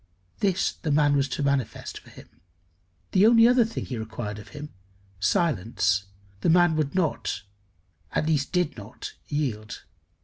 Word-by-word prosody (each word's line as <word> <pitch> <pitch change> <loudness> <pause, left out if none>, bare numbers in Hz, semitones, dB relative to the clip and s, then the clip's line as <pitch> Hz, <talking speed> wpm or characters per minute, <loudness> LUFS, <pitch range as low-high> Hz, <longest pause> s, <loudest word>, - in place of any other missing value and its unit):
This 195 -2 +1
the 160 - -5
man 145 0 +4
was 140 -1 +1
to 145 - -2
manifest 140 -4 -1
for - - -18
him. - - -14 0.8
The 195 +3 +5
only 230 0 +7
other 245 0 +5
thing 225 0 -4
he 125 -4 -5
required 110 -1 -5
of 105 - -12
him 150 0 -9 0.5
silence 100 - +1 0.3
the - - +1
man 175 -1 +5
would 155 -1 -1
not, 165 - -1 0.7
at - - 0
least 150 -3 0
did 180 -3 0
not, 105 +1 -8
yield. 125 -8 -3
145 Hz, 150 wpm, -26 LUFS, 110-175 Hz, 0.8 s, only